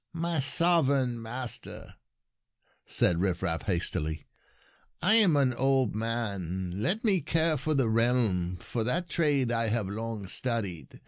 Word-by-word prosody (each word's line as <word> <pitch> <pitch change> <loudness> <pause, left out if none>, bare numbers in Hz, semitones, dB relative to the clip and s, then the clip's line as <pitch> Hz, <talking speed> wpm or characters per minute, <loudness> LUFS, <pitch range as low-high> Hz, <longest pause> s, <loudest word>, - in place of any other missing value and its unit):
" - - -53
My 170 -3 -1
sovereign 140 -5 +3
master," 120 +2 -2 0.9
said 85 - +3
Rifraf 85 -3 -1
hastily, 85 -4 -1 0.4
" - - -32 0.3
I 215 - +4
am 195 -9 +4
an 135 -3 +2
old 130 -1 +1
man. 100 -6 -3
Let 205 - -1
me 195 -6 +2
care 160 +2 +1
for 150 +2 -2
the 135 -4 +1
realm, 110 -6 +1
for 110 +6 -4
that 170 +10 -1
trade 145 -8 0
I 115 -1 0
have 110 -2 -1
long 110 0 -5
studied. 100 -7 -2
120 Hz, 140 wpm, -28 LUFS, 100-140 Hz, 0.9 s, I